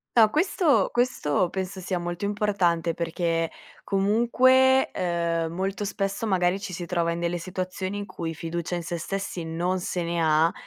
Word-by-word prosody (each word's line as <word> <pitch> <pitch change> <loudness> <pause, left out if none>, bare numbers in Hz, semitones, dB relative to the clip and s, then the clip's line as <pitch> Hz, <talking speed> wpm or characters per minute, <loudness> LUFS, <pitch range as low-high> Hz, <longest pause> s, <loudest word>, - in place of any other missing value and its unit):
No, 220 -2 +7
questo 340 -2 +2
questo 185 - +1
penso 190 0 -4
sia 185 0 -2
molto 175 +2 -3
importante 195 -5 +1
perché 165 -1 -1 0.3
comunque, 245 +6 +4
uhm, 170 -2 -1
molto 195 +2 -2
spesso 200 +2 -2
magari 185 -2 +2
ci 195 -3 -6
si 175 0 -4
trova 170 -2 0
in 170 - -3
delle 175 0 -1
situazioni 185 +2 -4
in 205 - -4
cui 170 -3 -5
fiducia 170 +2 -4
in 175 - -2
sé 170 +1 -3
stessi 190 0 -4
non 175 +3 -1
se 175 -1 -2
ne 170 0 -2
ha. 160 +1 +4
180 Hz, 165 wpm, -26 LUFS, 170-200 Hz, 0.3 s, No